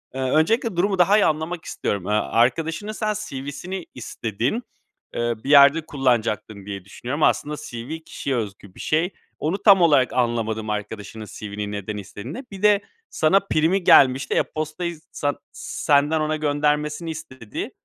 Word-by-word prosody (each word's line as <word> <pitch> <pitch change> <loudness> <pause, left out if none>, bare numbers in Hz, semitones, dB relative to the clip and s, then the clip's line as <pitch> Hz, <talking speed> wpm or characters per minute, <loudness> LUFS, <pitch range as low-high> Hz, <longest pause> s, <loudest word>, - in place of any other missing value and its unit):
Iıı, 135 - -2
öncelikle 220 +6 +2
durumu 190 +2 +1
daha 195 +4 +5
iyi 210 - +4
anlamak 160 +2 -1
istiyorum. 100 -3 -3
Iıı, - - -2
arkadaşının 160 - 0
sen 215 -1 -1 0.2
CV'sini 145 +7 -6
istedin, 120 - -3 0.5
ııı, 120 -2 -2
bir 140 - -5
yerde 145 +2 +7
kullanacaktın 115 -7 -1
diye 100 -2 -6
düşünüyorum. 130 +8 -4
Aslında 150 +1 +2
CV 125 +7 -6
kişiye 135 -2 -3
özgü 100 -4 -5
bir - - -14
şey. 170 +4 0 0.3
Onu 165 +6 0
tam 195 -4 +7
olarak 145 -6 +4
anlamadım, 110 -3 -1
arkadaşının 105 +1 -5
CV'ni 105 0 -6
neden 105 +1 -4
istediğini. 105 - -7
Bir 195 +1 -9
de 205 -1 +5 0.3
sana 175 +5 +3
primi 180 0 +1
gelmişti, 130 -2 +5
e-postayı 155 +2 -2
san 145 -1 -2
senden 150 +1 +1
ona 155 0 0
göndermesini 150 +2 0
istedi, 130 -8 -7
145 Hz, 145 wpm, -23 LUFS, 115-165 Hz, 0.5 s, yerde